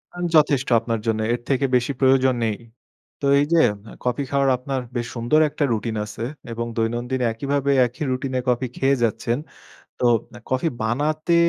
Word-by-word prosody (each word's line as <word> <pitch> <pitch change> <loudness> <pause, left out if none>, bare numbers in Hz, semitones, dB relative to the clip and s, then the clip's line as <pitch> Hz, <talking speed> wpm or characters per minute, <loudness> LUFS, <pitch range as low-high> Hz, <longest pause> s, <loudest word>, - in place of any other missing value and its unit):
আ - - -10 0.2
যথেষ্ট 145 -3 +4
আপনার 115 -1 -2
জন্যে। 110 -1 +1
এর 120 - -3
থেকে 135 0 +2
বেশি 125 +2 +1
প্রয়োজন 130 -1 +4
নেই। 105 -2 -1 0.6
তো - - -2
এই 145 - +3
যে 170 - +5 0.3
এ - - -13
কফি 125 +3 0
খাওয়ার 140 -1 +2
আপনার 130 +1 -3
বেশ 120 -1 -2
সুন্দর 120 +6 +2
একটা 145 - -2
রুটিন 110 0 -1
আছে 105 +2 -7 0.3
এবং 115 +1 -3
দৈনন্দিন 120 +3 -1
একইভাবে 140 +4 -1 0.2
একই 125 +6 -7
রুটিনে 130 0 -2
কফি 125 +1 +1
খেয়ে 135 +1 +3
যাচ্ছেন। 115 +2 0 0.6
তো 125 - +1 0.3
এ - - -11
কফি 130 +5 +1 0.2
বানাতে 155 +8 0
130 Hz, 170 wpm, -22 LUFS, 115-140 Hz, 0.6 s, যে